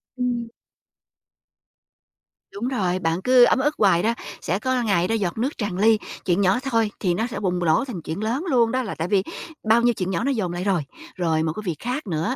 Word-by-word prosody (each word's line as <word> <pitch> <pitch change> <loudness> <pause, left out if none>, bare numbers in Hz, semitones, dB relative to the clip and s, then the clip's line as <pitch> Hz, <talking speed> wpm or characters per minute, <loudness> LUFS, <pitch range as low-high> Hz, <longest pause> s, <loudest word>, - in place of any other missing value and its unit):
Ừm. 245 -2 -1 2.1
Đúng 220 +5 -3
rồi, 185 -8 0
bạn 165 +1 -1
cứ 250 +1 +6
ấm 250 - +4
ức 295 +3 +1
hoài 185 -4 +4
đó, 230 - +2 0.3
sẽ 185 +5 -1
có 255 +1 0
ngày 180 -5 +2
đó 225 - 0
giọt 195 -3 -2
nước 260 +7 -2
tràn 205 -5 -3
ly 215 +2 +4 0.3
chuyện 180 +1 +2
nhỏ 195 +5 +3
thôi 230 -5 +1
thì 180 -3 +1
nó 225 +7 -1
sẽ 230 - -5
bùng 180 -3 -1
nổ 165 +7 +2
thành 215 -10 -6
chuyện 160 +7 -5
lớn 250 +9 -1
luôn 235 -4 +3
đó 260 0 0
là 220 - -5
tại 165 +2 -3
vì 195 -1 +2 0.4
bao 225 +2 +4
nhiêu 240 0 +3
chuyện 185 -2 -3
nhỏ 190 +6 -1
nó 280 - +1
dồn 190 -9 -1
lại 175 +1 -3
rồi. 190 -5 +1 0.3
Rồi 160 -3 0
một 160 - -1
cái 215 - -7
việc 175 -4 -1
khác 250 0 -4
nữa 170 +10 -1
205 Hz, 230 wpm, -23 LUFS, 180-240 Hz, 2.1 s, cứ